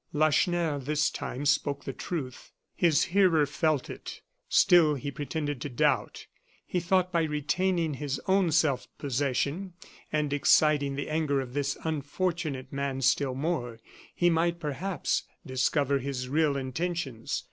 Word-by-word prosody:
Lacheneur, 155 +1 +2
this 150 +3 0
time, 135 +3 -5
spoke 145 -1 +1
the 135 - -5
truth. 130 -4 -6 0.2
His 165 -5 +3
hearer 180 -6 +4
felt 150 -1 0
it; - - -8 0.3
still 170 -5 +5
he 140 +1 -4
pretended 145 -1 -4
to 145 - -4
doubt. 120 - 0 0.4
He 180 - -1
thought 185 +1 +1
by 170 -1 +2
retaining 160 +2 0
his 140 0 -3
own 190 -2 +3
self 140 -5 +2
possession, 140 +6 -1 0.4
and 150 -2 0
exciting 145 -1 +3
the 145 - -3
anger 155 -3 0
of 125 -2 -5
this 145 0 -1
unfortunate 155 -2 -2
man 140 -1 -2
still 135 0 +2
more, 130 -6 -2 0.4
he 175 - +2
might, 170 +1 +1
perhaps, 165 +3 -2 0.2
discover 140 +2 +1
his 130 -1 -4
real 145 +1 +1
intentions. 135 -2 -3
145 Hz, 135 wpm, -28 LUFS, 135-165 Hz, 0.4 s, still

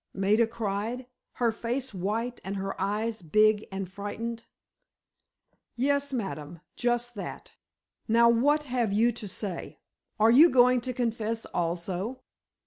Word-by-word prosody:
Maida 210 +4 +3
cried, 225 +2 -3 0.3
her 235 -2 +1
face 240 +3 -3
white 220 +6 -2
and 195 +1 -4
her 195 0 -3
eyes 215 +2 -1
big 215 +5 +3
and 195 -1 -4
frightened. 225 +4 -5 1.3
"Yes, 280 +3 +1
ma'am, 170 - -4 0.2
just 240 0 0
that! 205 - -7 0.5
Now, 235 +1 +5
what 285 +6 +3
have 245 -6 -1
you 225 +4 +3
to 225 -2 -7
say? 190 -2 -5 0.4
Are 220 +2 +6
you 300 +8 +8
going 250 -2 +5
to 255 +1 -3
confess 230 -2 -2
also?" 180 +8 -3
225 Hz, 130 wpm, -28 LUFS, 200-245 Hz, 1.3 s, you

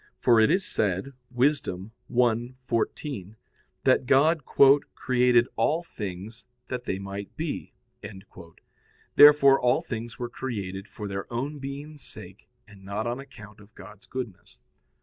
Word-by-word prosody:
For 120 -2 +4
it 110 - +5
is 185 +4 +2
said 105 +6 -1 0.2
(Wis. 130 +3 +2
1:14) 115 - -2 0.5
that 130 -1 +3
God 145 +2 +3 0.5
"created 125 -1 +3
all 160 +3 +1
things 105 - -7 0.2
that 125 -1 -4
they 95 - -2
might 100 +1 -7
be." 160 -2 -4 1.4
Therefore 145 -2 +8
all 125 +1 +3
things 115 0 -6
were 120 - -3
created 100 -6 -5
for 105 - -7
their 100 +2 -5
own 140 +5 -3
being's 140 +2 -7
sake, - - -10 0.2
and 100 -2 -16
not 100 +3 -4
on 120 +2 -2
account 110 -7 -13
of 105 +1 -19
God's 105 +1 -14
goodness. 120 -8 -7
120 Hz, 130 wpm, -26 LUFS, 105-135 Hz, 1.4 s, Therefore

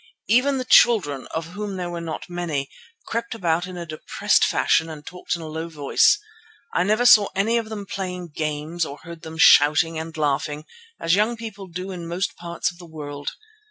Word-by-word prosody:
Even 255 +5 +3
the 255 - -3
children, 160 - +4
of 165 0 -5
whom 200 +1 -5
there 175 -1 -4
were 170 -1 -5
not 165 -1 -5
many, 165 -6 -3 0.3
crept 230 0 -3
about 175 -3 0
in 185 -1 -8
a 170 - -5
depressed 155 -1 +1
fashion 160 - +2
and 150 -2 -9
talked 180 0 -4
in 170 - -7
a - - -6
low 160 +2 -5
voice. 155 - +3 0.6
I - - +2
never 215 +6 +2
saw 215 -5 +8
any 225 +4 +2
of 220 -1 -6
them 210 -2 -6
playing 180 -3 -5
games 155 +2 -3
or 145 -2 -5
heard 170 -1 -10
them 160 -1 -9
shouting 160 +1 +5
and 160 0 -7
laughing, 150 0 -1 0.3
as 165 - +1
young 215 +4 +2
people 210 -4 -8
do 180 +2 -6
in 175 -2 -6
most 175 +3 -2
parts 170 0 -3
of 175 - -19
the 175 - -11
world. 145 -2 -6
170 Hz, 195 wpm, -23 LUFS, 160-200 Hz, 0.6 s, saw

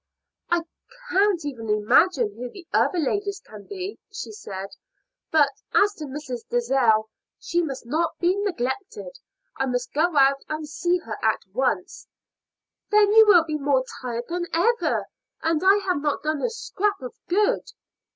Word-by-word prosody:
"I 345 -1 +2 0.5
can't 385 -4 +2
even 235 -6 -5
imagine 355 - +3
who 250 0 -6
the 360 +6 -12
other 365 - +2
ladies 400 +6 -1
can 210 - -13
be," 390 0 -6
she 410 - -6
said. 195 - -7 0.6
"But 295 -3 +4 0.2
as 410 0 +4
to 310 - -7
Mrs. 265 -3 -6
Dalzell, 240 -3 +2 0.3
she 345 - 0
must 275 -7 -5
not 315 +7 -1
be 355 +2 +2
neglected; 400 - -3 0.4
I 270 - 0
must 245 -1 -2
go 315 +1 +1
out 275 0 +5
and 310 0 -4
see 345 +4 0
her 220 -2 -6
at 220 -2 +1
once." 265 - -1 0.8
"Then 420 -1 +4
you 440 0 +8
will 355 -6 +7
be 310 -2 -3
more 275 -2 +2 0.2
tired 240 -2 -4
than 350 0 -3
ever, 460 +9 +1 0.4
and 325 0 +1
I 385 +1 +7
have 360 -6 +1
not 290 -1 -1
done 305 -1 -1
a - - +1
scrap 420 -4 -2
of 250 - -6
good." 420 +7 +1
315 Hz, 160 wpm, -24 LUFS, 260-390 Hz, 0.8 s, you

